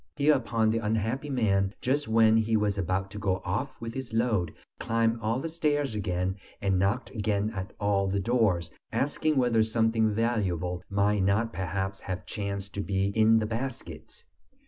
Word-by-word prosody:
Hereupon 120 Hz, -7 st, +2 dB
the 115 Hz, -, +1 dB
unhappy 115 Hz, +6 st, -1 dB
man, 100 Hz, -6 st, +1 dB
just 140 Hz, +3 st, 0 dB
when 110 Hz, 0 st, +5 dB
he 110 Hz, 0 st, +2 dB
was 105 Hz, -1 st, +1 dB
about 95 Hz, 0 st, -1 dB
to 105 Hz, -, -6 dB
go 95 Hz, -2 st, 0 dB
off 90 Hz, +4 st, -3 dB
with 115 Hz, 0 st, -6 dB
his 130 Hz, -3 st, -6 dB
load, 110 Hz, -8 st, +1 dB, 0.3 s
climbed 115 Hz, 0 st, +1 dB
all 115 Hz, +3 st, 0 dB
the 165 Hz, -, -3 dB
stairs 150 Hz, -5 st, 0 dB
again, 95 Hz, -2 st, -2 dB, 0.2 s
and 95 Hz, -2 st, +1 dB
knocked 100 Hz, +7 st, 0 dB
again 105 Hz, -2 st, -1 dB
at 95 Hz, -3 st, -6 dB
all 100 Hz, -1 st, +1 dB
the 100 Hz, +1 st, 0 dB
doors, 95 Hz, -7 st, +1 dB, 0.2 s
asking 150 Hz, +2 st, 0 dB
whether 120 Hz, -3 st, +3 dB
something 110 Hz, 0 st, +2 dB
valuable 95 Hz, -6 st, -1 dB
might 100 Hz, +1 st, +2 dB
not 105 Hz, +5 st, +1 dB
perhaps 95 Hz, +1 st, -3 dB
have 95 Hz, -1 st, -5 dB
chanced 100 Hz, -1 st, -4 dB
to 100 Hz, -, -2 dB
be 95 Hz, 0 st, 0 dB
in 110 Hz, +2 st, +4 dB
the 110 Hz, -, +1 dB
baskets. 120 Hz, +4 st, -6 dB
110 Hz, 170 wpm, -28 LUFS, 100-115 Hz, 0.3 s, when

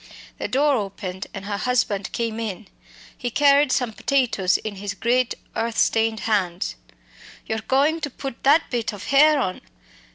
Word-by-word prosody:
The -, -, -2 dB
door 280 Hz, +1 st, +2 dB
opened 190 Hz, -2 st, -5 dB
and 195 Hz, 0 st, -8 dB
her 205 Hz, 0 st, -3 dB
husband 215 Hz, -6 st, 0 dB
came 230 Hz, -1 st, -2 dB
in. 215 Hz, -2 st, -5 dB, 0.5 s
He 245 Hz, -, -3 dB
carried 280 Hz, +1 st, +4 dB
some 250 Hz, -4 st, 0 dB
potatoes 235 Hz, -9 st, +1 dB
in 210 Hz, -2 st, -6 dB
his 200 Hz, +1 st, -5 dB
great 245 Hz, +3 st, +1 dB, 0.2 s
earth 230 Hz, 0 st, -2 dB
stained 225 Hz, -1 st, +2 dB
hands. 190 Hz, -5 st, 0 dB, 0.7 s
"You're 220 Hz, -, -2 dB
goin' 285 Hz, +8 st, +1 dB
to 295 Hz, -, -2 dB
put 270 Hz, -1 st, -7 dB
that 295 Hz, +4 st, +3 dB
bit 230 Hz, -3 st, -1 dB
of 205 Hz, -1 st, -8 dB
hare 300 Hz, +4 st, +5 dB
on? 185 Hz, -8 st, -2 dB
230 Hz, 160 wpm, -23 LUFS, 205-270 Hz, 0.7 s, hare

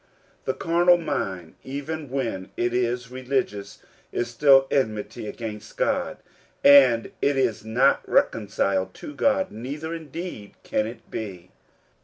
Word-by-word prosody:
The 130 Hz, -, -1 dB
carnal 175 Hz, +1 st, +4 dB
mind, 95 Hz, -, -3 dB
even 145 Hz, +2 st, -5 dB
when 115 Hz, -8 st, -3 dB
it 120 Hz, 0 st, 0 dB
is 125 Hz, 0 st, -1 dB
religious, 130 Hz, -5 st, -3 dB, 0.3 s
is 120 Hz, -, -2 dB
still 135 Hz, +2 st, +6 dB
enmity 110 Hz, -4 st, -1 dB
against 105 Hz, -1 st, -7 dB
God, -, -, 0 dB, 0.5 s
and 130 Hz, -5 st, +7 dB
it 140 Hz, -1 st, +2 dB
is 125 Hz, -6 st, +1 dB
not 125 Hz, +5 st, +3 dB
reconciled 95 Hz, -3 st, +1 dB
to 295 Hz, -, -8 dB
God, 280 Hz, 0 st, +1 dB
neither 145 Hz, +8 st, -5 dB
indeed 160 Hz, -, -7 dB
can 105 Hz, -, 0 dB
it 115 Hz, +2 st, -11 dB
be. 95 Hz, -5 st, -6 dB
125 Hz, 125 wpm, -25 LUFS, 105-140 Hz, 0.5 s, and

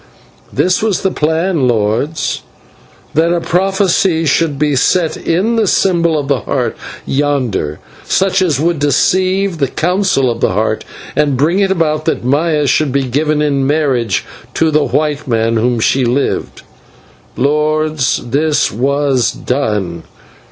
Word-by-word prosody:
This 180 Hz, 0 st, +1 dB
was 215 Hz, -4 st, 0 dB
the 190 Hz, -, +1 dB
plan, 160 Hz, -1 st, 0 dB
lords: 120 Hz, +7 st, -1 dB, 0.7 s
that 165 Hz, +2 st, +2 dB
a 175 Hz, -, +1 dB
prophecy 185 Hz, -1 st, +1 dB
should 150 Hz, 0 st, +1 dB
be 150 Hz, 0 st, +1 dB
set 165 Hz, +5 st, +1 dB
in 205 Hz, +8 st, 0 dB
the 220 Hz, -2 st, +2 dB
symbol 170 Hz, -4 st, +2 dB
of 145 Hz, -2 st, -3 dB
the 140 Hz, -2 st, +1 dB
Heart -, -, -2 dB, 0.3 s
yonder, 130 Hz, -, -1 dB, 0.3 s
such 190 Hz, 0 st, +1 dB
as 160 Hz, -8 st, +1 dB
would 165 Hz, 0 st, 0 dB
deceive 185 Hz, +5 st, +1 dB
the 140 Hz, -, +1 dB
Council 175 Hz, -5 st, +1 dB
of 115 Hz, -, -6 dB
the -, -, +1 dB
Heart, 110 Hz, +2 st, -1 dB, 0.3 s
and 145 Hz, -3 st, +1 dB
bring 160 Hz, +8 st, +2 dB
it 195 Hz, -1 st, +2 dB
about 155 Hz, -4 st, 0 dB
that 160 Hz, -, -1 dB
Maya 150 Hz, +3 st, +1 dB
should 140 Hz, +1 st, +1 dB
be 140 Hz, +1 st, +1 dB
given 150 Hz, +4 st, 0 dB
in 140 Hz, -2 st, 0 dB
marriage 135 Hz, -, 0 dB, 0.3 s
to 160 Hz, -1 st, +2 dB
the 150 Hz, -1 st, +2 dB
white 150 Hz, -1 st, -1 dB
man 115 Hz, -1 st, +1 dB
whom 120 Hz, +1 st, +1 dB
she 130 Hz, +4 st, +2 dB
loved. 125 Hz, +4 st, -1 dB, 0.7 s
Lords, 150 Hz, +1 st, 0 dB
this 145 Hz, +4 st, +1 dB
was 135 Hz, 0 st, +1 dB
done. 105 Hz, -10 st, -2 dB
150 Hz, 145 wpm, -14 LUFS, 130-170 Hz, 0.7 s, that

